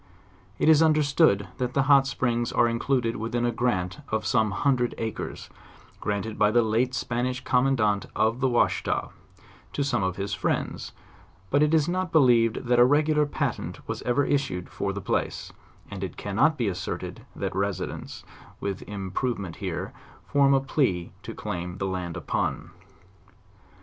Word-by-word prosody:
It -, -, +1 dB
is 160 Hz, -1 st, +7 dB
understood 150 Hz, -, +4 dB
that 125 Hz, -1 st, -2 dB
the 135 Hz, -, +3 dB
hot 140 Hz, -1 st, +5 dB
springs 120 Hz, -3 st, -1 dB
are 120 Hz, -, +3 dB
included 115 Hz, 0 st, 0 dB
within 115 Hz, +2 st, -1 dB
a 120 Hz, -, +1 dB
grant 95 Hz, -8 st, -1 dB
of 110 Hz, 0 st, -1 dB
some 110 Hz, -3 st, +2 dB
hundred 125 Hz, +3 st, +1 dB
acres; 110 Hz, -2 st, -5 dB, 0.5 s
granted 105 Hz, +1 st, -3 dB
by 105 Hz, -, +5 dB
the 120 Hz, +2 st, +4 dB
late 120 Hz, +3 st, +1 dB
Spanish 125 Hz, +2 st, -2 dB
commandant 125 Hz, -6 st, +2 dB
of 110 Hz, +3 st, +1 dB
the 130 Hz, 0 st, +2 dB
Washita, 120 Hz, -, +1 dB, 0.6 s
to 145 Hz, -, 0 dB
some 125 Hz, -6 st, 0 dB
of 95 Hz, -1 st, -1 dB
his 100 Hz, +1 st, -3 dB
friends, -, -, -2 dB, 0.6 s
but 145 Hz, -, +3 dB
it 150 Hz, 0 st, +4 dB
is 160 Hz, -2 st, +3 dB
not 180 Hz, 0 st, -1 dB
believed 120 Hz, -7 st, +4 dB
that 120 Hz, 0 st, +3 dB
a -, -, +9 dB
regular 150 Hz, +3 st, +3 dB
patent -, -, -3 dB
was -, -, -4 dB
ever 125 Hz, +3 st, +1 dB
issued 130 Hz, -11 st, -1 dB
for -, -, -2 dB
the -, -, -5 dB
place: -, -, -2 dB, 0.4 s
and 100 Hz, -1 st, -5 dB
it 95 Hz, -, -5 dB
cannot 115 Hz, +10 st, +2 dB
be 120 Hz, -4 st, 0 dB
asserted 90 Hz, -1 st, -4 dB
that -, -, -3 dB
residence, 100 Hz, 0 st, -3 dB, 0.4 s
with 100 Hz, -1 st, -3 dB
im 100 Hz, -2 st, -5 dB
provement 100 Hz, -8 st, -2 dB
here, -, -, -4 dB, 0.3 s
form 140 Hz, -1 st, +4 dB
a -, -, +4 dB
plea 125 Hz, -, 0 dB
to -, -, -8 dB
claim 90 Hz, +1 st, -5 dB
the 95 Hz, -, -2 dB
land 90 Hz, -3 st, -3 dB
upon. -, -, -2 dB
120 Hz, 160 wpm, -26 LUFS, 100-135 Hz, 0.6 s, a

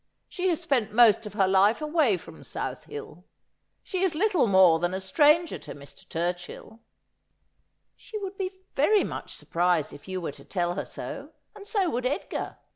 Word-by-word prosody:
She 375 Hz, 0 st, -1 dB
has 335 Hz, -, +1 dB
spent 270 Hz, -10 st, 0 dB
most 225 Hz, -1 st, +5 dB
of 210 Hz, -, -9 dB
her 195 Hz, -3 st, +3 dB
life 195 Hz, +3 st, +4 dB
away 305 Hz, -, +2 dB
from 165 Hz, -, -13 dB
South -, -, -5 dB
Hiil. 440 Hz, 0 st, -9 dB, 0.6 s
She 370 Hz, -, -3 dB
is 375 Hz, -4 st, +1 dB
little 365 Hz, -, +2 dB
more 190 Hz, -4 st, +6 dB
than 175 Hz, +2 st, -1 dB
a -, -, -2 dB
stranger 300 Hz, -, +3 dB
to -, -, -9 dB
Mr. 140 Hz, -1 st, -15 dB
Turchill.' 175 Hz, +6 st, -4 dB, 0.6 s
* -, -, -46 dB, 0.3 s
She 440 Hz, -, -8 dB
would 395 Hz, -2 st, -5 dB
be 375 Hz, -1 st, -5 dB
very 390 Hz, +9 st, +4 dB
mnch -, -, -6 dB
surprised 175 Hz, -3 st, 0 dB
if 145 Hz, -, -13 dB
you 185 Hz, 0 st, -3 dB
were 170 Hz, -, -4 dB
to 140 Hz, -1 st, -15 dB
tell 175 Hz, 0 st, -1 dB
her 195 Hz, -, -4 dB
so, -, -, -7 dB, 0.2 s
and 405 Hz, -1 st, -11 dB
so 405 Hz, -4 st, +1 dB
would 250 Hz, +1 st, -1 dB
Edgar. 285 Hz, +9 st, -4 dB
230 Hz, 185 wpm, -27 LUFS, -, 0.6 s, more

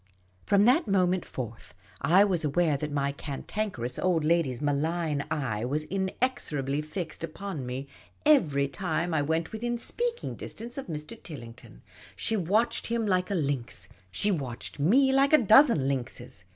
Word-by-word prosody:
From 200 Hz, 0 st, +5 dB
that 260 Hz, +5 st, +4 dB
moment 185 Hz, -2 st, +2 dB
forth, 115 Hz, -7 st, -7 dB, 0.3 s
I 175 Hz, +8 st, +6 dB
was 185 Hz, -5 st, 0 dB
aware 155 Hz, +1 st, +2 dB
that 150 Hz, +2 st, -3 dB
my 140 Hz, -1 st, 0 dB
Cantanker 145 Hz, -, -4 dB
ous 125 Hz, -, -4 dB
Old 175 Hz, -4 st, +2 dB
lyady's 155 Hz, -6 st, +2 dB
malign 150 Hz, +1 st, 0 dB
eye 130 Hz, -9 st, -2 dB
was 145 Hz, +5 st, -1 dB
inexorably 190 Hz, -, -1 dB
fixed 160 Hz, +1 st, -6 dB
upon 165 Hz, -4 st, -5 dB
me 130 Hz, +2 st, -4 dB, 0.4 s
every 155 Hz, -, +4 dB
time 170 Hz, +3 st, -2 dB
I 155 Hz, -, +2 dB
went 160 Hz, +3 st, -1 dB
within 240 Hz, +2 st, -2 dB
speaking 475 Hz, -, -2 dB
distance 235 Hz, +2 st, -7 dB
of 275 Hz, -, -6 dB
Mr. 160 Hz, +7 st, -7 dB
Tilling 120 Hz, -9 st, -9 dB
ton, -, -, -17 dB, 0.3 s
She 225 Hz, -, -1 dB
watched 215 Hz, +5 st, +1 dB
him 230 Hz, -1 st, 0 dB
like 185 Hz, -2 st, +1 dB
a 200 Hz, -, 0 dB
lynx. 135 Hz, -, -2 dB, 0.2 s
She 205 Hz, -, +2 dB
watched 135 Hz, -5 st, -4 dB
fne 265 Hz, -, +4 dB
like 275 Hz, +2 st, +4 dB
a -, -, +10 dB
dozen 220 Hz, -, +6 dB
lynxes. 135 Hz, -4 st, -4 dB
165 Hz, 160 wpm, -28 LUFS, 140-210 Hz, 0.4 s, a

